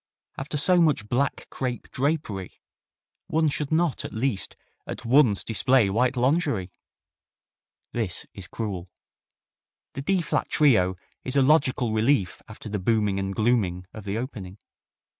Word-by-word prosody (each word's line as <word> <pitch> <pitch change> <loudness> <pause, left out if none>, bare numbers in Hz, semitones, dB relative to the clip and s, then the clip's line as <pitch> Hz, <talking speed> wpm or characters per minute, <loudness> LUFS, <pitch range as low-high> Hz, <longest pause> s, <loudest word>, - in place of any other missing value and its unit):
After 145 +2 -4
so 175 +4 +5
much 145 -10 +2
black 135 +5 -1
crepe 125 -2 -4
drapery 130 - -2 0.7
one 160 -1 +2
should 145 0 -3
not 160 -2 +1
at - - -6
least 110 -3 -1 0.3
at - - -6
once 120 -4 +4
display 115 -2 +2
white 125 +5 +1
lingerie!" 130 - +1 1.2
This 105 -8 -1
is 95 -3 -9
cruel. 95 -5 -5 1.0
The 135 - -5
D 185 +4 +1
flat 150 - -1
Trio 110 -11 +3 0.3
is 130 - -4
a 140 - +5
logical 130 -5 +3
relief 110 -3 +1
after 110 0 -10
the 105 -1 -3
booming 105 -1 +1
and 95 0 -3
glooming 105 -6 +1
of 110 - -9
the 100 +2 -2
opening. 105 -6 -6
120 Hz, 140 wpm, -25 LUFS, 100-140 Hz, 1.2 s, so